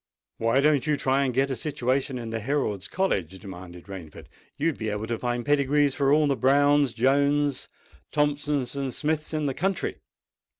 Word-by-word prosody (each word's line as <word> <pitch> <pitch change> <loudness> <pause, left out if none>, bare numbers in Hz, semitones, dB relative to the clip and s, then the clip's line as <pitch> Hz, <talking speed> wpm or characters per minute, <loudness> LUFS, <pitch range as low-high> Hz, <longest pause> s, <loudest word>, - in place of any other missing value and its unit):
"Why 115 +4 +3
don't 150 -1 +3
you 150 -1 +2
try 135 0 +2
and 130 - 0
get 135 +2 +1
a - - -1
situation 135 0 -1
in 115 -2 -6
the 115 - -2
Herald's 110 -6 -1
College?" 95 - -1
demanded 90 -2 -10
Rainford. 95 -6 -10 0.3
"You 155 +4 +1
would 160 - -5
be 110 -1 -2
able 105 +1 -3
to 115 0 -3
find 120 -1 -2
pedigrees 145 0 +3
for 140 0 +1
all 150 +1 +4
the 140 -1 +2
Browns, 145 0 +3
Jones's, 140 +3 +1 0.4
Thompsons, 145 -2 0
and 135 -2 -2
Smiths 155 +3 -2
in 155 -2 -1
the 135 - 0
country." 190 +7 -1
135 Hz, 180 wpm, -26 LUFS, 115-145 Hz, 0.4 s, all